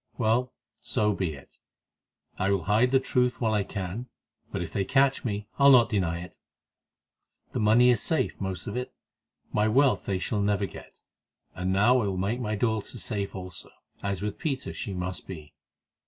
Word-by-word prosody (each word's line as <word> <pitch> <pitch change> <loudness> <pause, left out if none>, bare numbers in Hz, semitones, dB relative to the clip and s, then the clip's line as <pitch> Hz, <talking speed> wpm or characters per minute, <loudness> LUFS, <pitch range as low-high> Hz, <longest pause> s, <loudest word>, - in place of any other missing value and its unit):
Well, 120 +2 +1 0.3
so 105 0 +1
be 90 -4 -2
it; 70 - -16 0.8
I 95 - +1
will 100 -3 +1
hide 110 +8 +3
the 135 +1 +4
truth 125 -2 +1
while 110 -2 +1
I 105 - +2
can, 100 +5 -5 0.4
but - - -2
if 80 - -8
they 100 - +1
catch 135 +5 +2
me 105 -3 -3
I'll 140 0 +8
not 125 -4 +6
deny 85 -5 0
it. 90 - -11 1.1
The - - -2
money 115 +4 +5
is 115 -4 +1
safe, 160 -5 0
most 95 -2 -3
of 100 - -5
it; 125 +1 -4 0.6
my 105 +1 +3
wealth 130 +4 +3
they 95 - 0
shall 100 +3 -1
never 100 0 +1
get, - - -12 0.5
and 90 +1 -2
now 115 +7 +4
I 105 - -1
will 95 -2 -2
make 100 +6 -1
my 110 -3 -2
daughter 110 +2 -1
safe 100 -4 -4
also, 90 -2 -8 0.3
as 100 -1 -2
with 105 -1 -3
Peter 135 -4 -3
she 100 -6 -5
must 90 0 -4
be. 80 -6 -9
105 Hz, 185 wpm, -27 LUFS, 95-125 Hz, 1.1 s, I'll